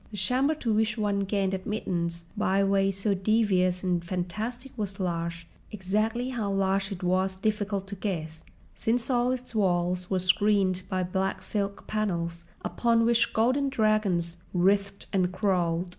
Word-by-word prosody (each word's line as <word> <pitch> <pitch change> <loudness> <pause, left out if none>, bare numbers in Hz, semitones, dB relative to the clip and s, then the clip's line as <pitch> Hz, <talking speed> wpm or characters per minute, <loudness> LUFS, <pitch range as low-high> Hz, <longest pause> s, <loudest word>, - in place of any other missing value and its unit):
The 210 - -8
chamber 255 - +2
to 235 -7 -1
which 220 +1 +1
one 205 -2 0
gained 195 -1 0
admittance 175 -4 -3
by 195 -2 +2
ways 195 -1 +2
so 200 +1 +2
devious 190 -3 +2
and 175 -2 0
fantastic 210 +9 -4
was 205 -4 -4
large—exactly 190 +6 -2
how 225 -6 -2
large 195 0 +1
it 185 -2 -6
was 185 +1 +1
difficult 205 0 -1
to 200 - -5
guess, 160 -5 -4 0.3
since 240 +3 0
all 245 0 +2
its 255 -1 -5
walls 180 -3 +1
were 190 - +1
screened 185 0 +2
by 185 -1 0
black 190 +2 -2
silk 200 -1 -3
panels 170 -5 -2 0.2
upon 230 -1 +2
which 235 0 +3
golden 255 +5 +2
dragons 210 -8 +1 0.2
writhed 200 +2 +2
and 185 -2 +2
crawled. 180 -3 0
195 Hz, 145 wpm, -28 LUFS, 180-215 Hz, 0.3 s, which